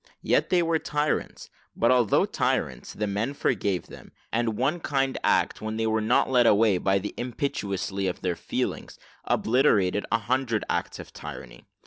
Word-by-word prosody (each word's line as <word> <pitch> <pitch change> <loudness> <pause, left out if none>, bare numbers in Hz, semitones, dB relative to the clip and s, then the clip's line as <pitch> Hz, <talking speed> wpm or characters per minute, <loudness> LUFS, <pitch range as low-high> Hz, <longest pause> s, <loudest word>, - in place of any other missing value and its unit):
Yet - - +2
they 180 -2 +3
were 165 -1 +1
tyrants; 150 0 -2 0.2
but 115 - +3
although 120 -5 +3
tyrants, 65 -1 -1
the 105 - -2
men 105 +7 -2
forgave 100 -8 0
them, - - -13 0.2
and 115 -2 0
one 145 +7 0
kind 135 -4 0
act, - - +2
when 110 0 -4
they 115 - 0
were 110 0 +1
not 110 +3 +3
led 125 -2 +4
away 105 -3 +4
by 95 +1 +2
the 100 +2 -4
impetuosity 100 -6 -2
of 90 - -4
their 90 -2 -1
feelings, - - -4 0.3
obliterated 105 -5 +2
a - - +4
hundred 115 -1 -1
acts - - -2
of - - -11
tyranny. - - -9
110 Hz, 165 wpm, -26 LUFS, 100-130 Hz, 0.3 s, led